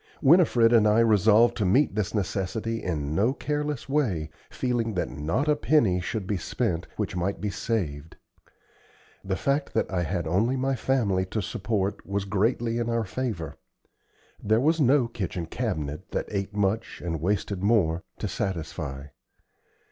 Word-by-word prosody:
Winifred 135 -7 +5
and 110 -2 +5
I 105 +2 +4
resolved 110 +1 +5
to 110 - 0
meet 115 +9 +3
this 105 +1 -2
necessity 105 +3 -2
in 75 -4 -2
no 110 +10 +2
careless 150 -2 -3
way, 105 - 0 0.2
feeling 120 -4 -1
that 90 - -1
not 80 - -1
a 150 - +4
penny 115 -12 +2
should 100 +3 -3
be 100 +1 -1
spent 85 0 -2
which - - -2
might 90 +3 -1
be 105 -1 -2
saved. 80 -10 -3 1.1
The 95 -1 -1
fact 140 +6 -1
that - - 0
I 90 - +1
had 85 0 -2
only 105 +11 +1
my 135 +1 0
family 110 -7 0
to 110 - -2
support 100 -2 -2
was 100 0 -2
greatly 115 +3 0
in 120 0 -1
our 115 -1 0
favor. 100 - -4 0.9
There 110 +2 +3
was 160 +5 +2
no 130 -2 +4
kitchen 95 -6 -4
cabinet, 80 - -4
that - - -1
ate 100 0 -3
much 105 +2 -1
and 80 -3 -2
wasted 100 +1 -1
more, 95 -6 +2 0.2
to - - -3
satisfy. 80 -6 -4
105 Hz, 155 wpm, -26 LUFS, 90-120 Hz, 1.1 s, Winifred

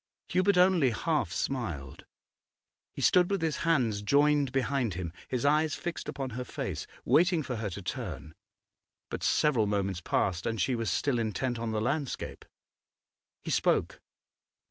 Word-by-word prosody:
Hubert 185 +1 +3
only 180 -6 +5
half 125 - -1
smiled; 90 - -3 0.9
he - - -6
stood 180 -1 +5
with 195 -4 -1
his 160 -2 0
hands 125 -11 +1
joined 145 +4 +3
behind 135 -6 0
him, 85 -2 -4
his 125 0 -2
eyes 150 +1 +3
fixed 175 -2 -5
upon 135 -2 -4
her 125 +3 -4
face, - - -5 0.2
waiting 175 -1 +4
for 125 -3 -4
her 110 -2 -2
to 95 +2 -7
turn 75 -2 -5 0.8
But - - -4
several 125 -9 +2
moments 100 -3 -1
passed 90 0 0
and 115 -1 -2
she 125 - +1
was 115 -3 -1
still 125 +7 +1
intent 115 +2 -1
on 115 -1 -2
the 110 - 0
landscape. 140 +3 -3 1.0
He - - -4
spoke. - - +1
125 Hz, 150 wpm, -29 LUFS, 105-150 Hz, 1.0 s, only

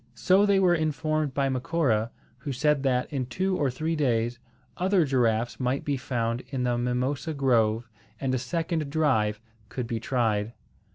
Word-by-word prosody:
So 185 - +4
they 200 -1 +4
were 180 -2 +4
informed 155 -3 -1
by 140 -1 +2
Macora, 130 -4 0 0.3
who 140 +2 -5
said 145 +2 +1
that, 130 0 0
in 130 -3 -2
two 185 +8 -1
or 145 -6 +1
three 155 +6 -2
days, 120 -4 0 0.4
other 185 -2 +2
giraffes 120 -4 +1
might 130 +1 -1
be 145 - 0
found 120 -3 -2
in 130 -3 -2
the 125 -1 +1
mimosa 125 +6 -1
grove, 120 -4 +2 0.3
and 135 -1 -1
a 130 - +1
second 165 +1 -2
drive 130 -9 +1 0.3
could 125 - -4
be 115 -1 -3
tried. 115 -3 0
130 Hz, 165 wpm, -27 LUFS, 120-155 Hz, 0.4 s, So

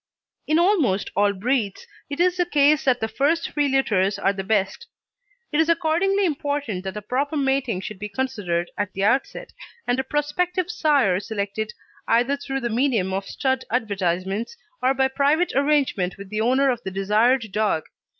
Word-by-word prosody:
In 310 - +3
almost 330 - +2
all 205 +1 +3
breeds 210 0 -1 0.2
it 285 - -5
is 360 +1 +3
the 355 - +2
case 300 -1 +3
that 255 -2 +2
the 220 - 0
first 285 +9 0
three 290 -1 +1
litters 205 -8 +1
are 195 - +1
the 195 -1 -5
best. 200 - -1 0.6
It 295 - +1
is 320 +1 +3
accordingly 345 +4 +2
important 285 - -2
that 190 +2 -4
a 210 - -6
proper 280 +7 -1
mating 270 -7 0
should 205 -1 -7
be 210 - -5
considered 200 -8 -2
at 205 -1 -2
the 195 - -2
outset, 265 - 0 0.3
and 245 +1 0
a - - 0
prospective 340 +6 -1
sire 270 - +2
selected 215 0 -4 0.3
either 245 +5 +3
through 270 -1 -4
the 240 - -1
medium 225 -6 +1
of 195 +1 -2
stud 265 -2 -1
advertisements 200 - -2 0.2
or 260 +2 +2
by 265 0 +3
private 290 +6 +1
arrangement 275 -10 +1
with 200 0 -11
the 215 0 -1
owner 260 +4 +3
of 240 -2 -4
the 190 - -5
desired 215 +4 +1
dog. 210 -6 0
255 Hz, 175 wpm, -23 LUFS, 200-290 Hz, 0.6 s, In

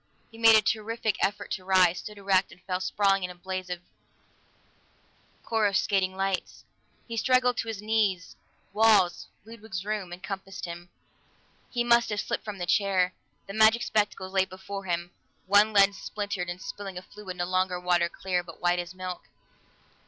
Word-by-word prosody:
He 225 - -13
made 225 -1 +8
a 215 - +5
terrific 220 -1 -1
effort 205 +1 -1
to 185 - -3
rise, 185 -2 +4
stood 210 -1 -9
erect, 195 -1 +2
and 175 - -15
fell 180 -1 -2
sprawling 195 0 +2
in 180 - -2
a 180 - -9
blaze 185 +1 -5
of 175 -1 -4 1.6
coruscating 195 -3 +1
lights. 195 -1 -2 0.4
He 230 - -5
struggled 250 +1 +3
to - - -2
his 215 -2 -5
knees; 210 -4 0 0.4
walls 210 -5 +4 0.2
Ludwig's 220 -4 -7
room 210 -4 -3
encompassed 195 +1 -6
him; 175 0 -8 0.8
he 240 -1 0
must 235 0 +4
have 210 -1 -2
slipped - - -2
from 210 -2 -6
the 175 - -3
chair. 185 -1 +2 0.3
The 195 - -8
magic 220 +2 +5
spectacles 205 -3 -1
lay 190 -1 +3
before 190 +1 -8
him, 175 -1 -2 0.3
one 205 +3 +5
lens 200 -1 +4
splintered 200 -4 -4
and 175 +1 -5
spilling 195 -1 -7
a 180 - -6
fluid 190 -2 -9
no 175 - -1
longer 185 0 0
water 175 -1 +2
clear, 185 -1 -2
but 170 -2 -12
white 175 0 +2
as 175 +1 -6
milk. 185 -1 -6
195 Hz, 165 wpm, -27 LUFS, 180-210 Hz, 1.6 s, made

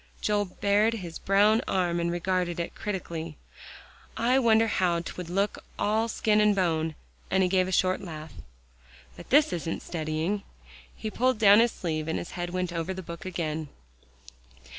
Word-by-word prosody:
'" - - -30
Joel 205 -1 +1
bared 205 +4 +1
his 175 -6 -7
brown 205 +3 +4
arm 175 -2 +1
and 170 0 0
regarded 175 0 -1
it 170 - -3
critically. 165 -6 -5 0.8
"I 250 +3 +3
wonder 225 -2 +4
how 180 -5 +1
'twould 175 0 -7
look 195 +3 -1
all 220 +2 +1
skin 215 -1 +2
and 210 -1 +4
bone," 160 -4 0 0.3
and 190 0 +3
he - - +3
gave 185 0 +2
a - - -4
short 185 0 +2
laugh. 155 -4 -8 0.8
"But - - -12
this 295 +3 +5
isn't 165 -1 -3
studying." 160 +4 -2 0.5
He 215 - -5
pulled 255 +2 +1
down 205 -1 +7
his 235 0 +4
sleeve, 155 -3 -3
and 160 - -1
his - - -6
head 175 -1 -4
went 180 -1 -2
over 170 +2 -3
the 190 - -6
book 170 +1 -8
again. 160 -4 -3
185 Hz, 170 wpm, -27 LUFS, 170-210 Hz, 0.8 s, down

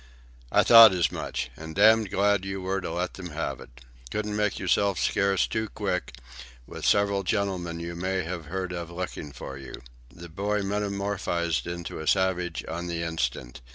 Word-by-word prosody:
"I - - +5
thought 115 -3 +10
as 85 -5 +1
much. 65 - -4
And 80 +2 -9
damned 110 +1 +5
glad 100 0 +2
you 95 0 -4
were 95 +1 -2
to - - -4
let 90 +2 -2
them 90 -2 -8
have - - -3
it. - - -14 0.3
Couldn't 105 +3 -3
make 105 -1 0
yourself 95 +1 +1
scarce 100 -2 +2
too 110 -1 -2
quick, 90 - -3 0.5
with - - -5
several 100 -1 +3
gentlemen 90 -4 -2
you 85 0 -5
may 95 +2 -1
have 85 -1 -5
heard 90 +3 -4
of 85 -2 -5
looking 85 -4 -5
for 65 0 -8
you." 70 - -8 0.4
The 85 0 -11
boy 100 +5 -1
metamorphosed 100 -4 -1
into 85 -1 -5
a 80 - -6
savage 90 -3 +1
on 85 +2 -4
the 85 -1 -3
instant. 80 -7 -3
95 Hz, 175 wpm, -27 LUFS, 85-100 Hz, 0.5 s, thought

